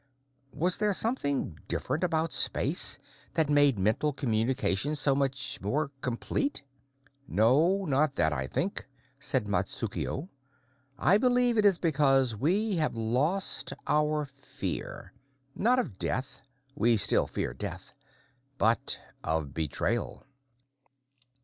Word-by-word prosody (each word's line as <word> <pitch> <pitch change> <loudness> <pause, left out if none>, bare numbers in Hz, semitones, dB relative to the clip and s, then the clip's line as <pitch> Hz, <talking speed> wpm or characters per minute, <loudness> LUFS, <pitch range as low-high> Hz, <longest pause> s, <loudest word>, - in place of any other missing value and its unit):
Was 175 +5 +1
there 210 -1 +2
something 140 - -1
different 160 - -2
about 165 -2 0
space - - +3 0.4
that 155 -2 +2
made 145 -4 +4
mental 110 +10 +1
communication 130 0 0
so 145 -1 +3
much 135 -1 -1
more 140 +9 -2
complete? 140 - -2 0.6
"No, 155 - +2
not 145 -1 +1
that, 80 -2 +2
I 65 -2 -3
think," 185 - -3 0.3
said 130 -4 +1
Matsukuo. 130 - -3 0.7
"I 195 +10 +4
believe 245 -1 +2
it 215 -2 +2
is 195 -4 +5
because 135 -7 +2
we 190 - 0
have 155 -6 0
lost 130 +12 +1
our 150 0 +1
fear 140 0 -7 0.4
not 240 - +2
of 140 - -3
death; 130 +1 -3 0.3
we 120 -4 +3
still - - +4
fear - - -4
death - - -7 0.6
but 115 -3 +2 0.2
of 80 -3 -2
betrayal." 80 -2 -3
140 Hz, 115 wpm, -28 LUFS, 115-170 Hz, 0.7 s, is